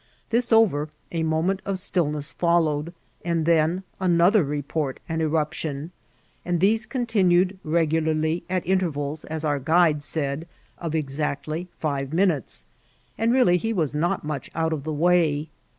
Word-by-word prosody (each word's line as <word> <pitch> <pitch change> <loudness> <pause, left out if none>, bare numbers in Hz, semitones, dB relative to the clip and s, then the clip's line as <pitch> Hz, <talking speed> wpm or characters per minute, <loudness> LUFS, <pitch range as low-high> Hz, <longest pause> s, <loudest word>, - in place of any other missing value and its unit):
This 235 +1 +2
over, 180 -10 +4 0.2
a 165 - -1
moment 160 +5 0
of 195 -1 -2
stillness 150 -6 -1
followed, 165 -2 +1 0.3
and 170 -2 0
then 165 +2 +2 0.2
another 180 +2 +4
report 145 -1 -3
and 160 0 -2
enq>tion, 155 -1 -2 0.5
and 175 -1 0
these 215 +5 +2
continued 195 -7 +2
regolarly, 160 0 +1
at 185 -1 -1
interrals, 160 -5 -1
as 160 0 -3
our 145 -2 +1
guide 160 +1 +3
said, 145 +1 -3 0.3
of 165 -2 -3
exactly 155 +3 -2
five 140 -2 -2
minutes, 160 - 0 0.5
and 225 +1 +1
really 240 -9 +4
he 225 +5 -2
was 160 -8 0
not 175 +5 0
much 150 -2 -4
out 160 0 0
of 145 -2 -4
the 155 - -2
way. 160 -1 +2
160 Hz, 140 wpm, -24 LUFS, 150-180 Hz, 0.5 s, over